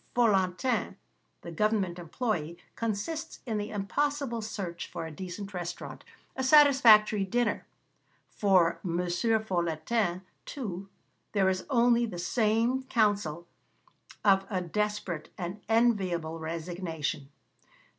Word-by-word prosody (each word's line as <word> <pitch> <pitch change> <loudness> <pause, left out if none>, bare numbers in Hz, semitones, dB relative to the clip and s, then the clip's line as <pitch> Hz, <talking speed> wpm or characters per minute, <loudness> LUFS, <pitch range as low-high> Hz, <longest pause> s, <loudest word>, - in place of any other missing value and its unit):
Folantin, 215 +1 +1 0.5
the 170 - -7
government 195 -1 0
employé, 170 -2 -3 0.2
consists 230 +10 -3
in 220 -4 -2
the 205 +1 -4
impossible 235 +4 -1
search 195 -5 -5
for - - -6
a 160 - -7
decent 190 +4 -7
restaurant, 175 -2 -6 0.3
a 265 - -2
satisfactory 255 -8 +6
dinner: 240 +5 -1 0.6
for 185 -5 +2
M. 170 -3 -2
Folantin, 180 -1 0 0.2
too, 195 -8 -6 0.4
there 195 -2 +3
is 185 0 -2
only 240 -2 +3
the 180 - -7
same 225 +7 +1
counsel 205 -10 0 0.8
of 195 -1 +4
a 190 -4 -1
desperate, 185 -2 -3
an 180 +3 -5
inevitable 190 -8 +1
resignation. 160 -3 -4
200 Hz, 105 wpm, -29 LUFS, 175-230 Hz, 0.8 s, satisfactory